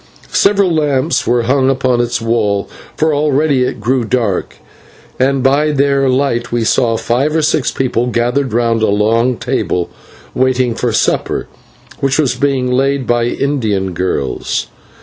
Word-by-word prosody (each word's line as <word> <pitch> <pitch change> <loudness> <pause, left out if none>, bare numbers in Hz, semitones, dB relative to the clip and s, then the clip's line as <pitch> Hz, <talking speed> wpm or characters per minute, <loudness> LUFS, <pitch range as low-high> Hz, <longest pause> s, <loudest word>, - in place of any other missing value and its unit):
Several 200 -3 +3
lamps 150 0 0
were 120 0 +2
hung 130 +2 +2
upon 130 -2 +1
its 120 0 -1
walls, 110 -3 -1 0.3
for 155 0 +1
already 145 -2 +1
it 125 - -3
grew 125 +4 0
dark, 115 -5 -1 0.6
and 135 0 +1
by 145 +3 +2
their 140 -1 +2
light 130 -2 0
we 120 -1 0
saw 115 0 +1
five 135 +8 0
or 160 - +1
six 155 - +1
people 125 -2 -1
gathered 125 +3 0
round 115 0 +1
a 110 - +3
long 115 +4 +1
table 90 -2 -2 0.4
waiting 130 -2 +1
for 120 +1 -1
supper, 105 - 0 0.5
which 135 0 0
was 150 -5 +2
being 135 -3 0
laid 135 +1 +1
by 120 0 +1
Indian 110 -8 -1
girls. 85 -7 -2
125 Hz, 150 wpm, -14 LUFS, 115-140 Hz, 0.6 s, Several